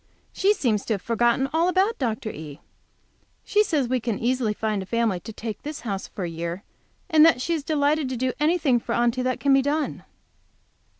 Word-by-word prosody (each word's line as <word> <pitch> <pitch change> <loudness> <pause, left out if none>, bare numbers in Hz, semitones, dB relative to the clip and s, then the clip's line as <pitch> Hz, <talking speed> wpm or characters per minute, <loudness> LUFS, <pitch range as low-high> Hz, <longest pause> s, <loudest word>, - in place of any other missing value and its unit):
She 405 +2 +3
seems 230 - 0
to 220 - 0
have 195 - -7
forgotten 240 +3 +2
all 330 +2 +3
about 385 +5 +1
Dr. 220 -4 -2
E. 150 -1 -9 0.8
She 420 0 +3
says 295 - 0
we 255 +1 0
can 230 -3 -2
easily 245 -2 0
find 215 -2 -1
a - - -6
family 230 -4 0
to 220 - -9
take 220 -1 -6
this 300 0 -6
house 200 -4 -4
for 195 - -6
a - - -2
year, 170 +3 -5 0.4
and 310 -1 +5
that 325 -5 +6
she 335 +7 -1
is 315 -3 -2
delighted 295 -1 +1
to 255 - -3
do 255 +1 0
anything 300 -5 +2
for 235 - -4
Aunty 240 +1 +1
that 255 0 -1
can 280 -1 +3
be 270 - +5
done. 290 +2 -2
250 Hz, 205 wpm, -24 LUFS, 220-300 Hz, 0.8 s, that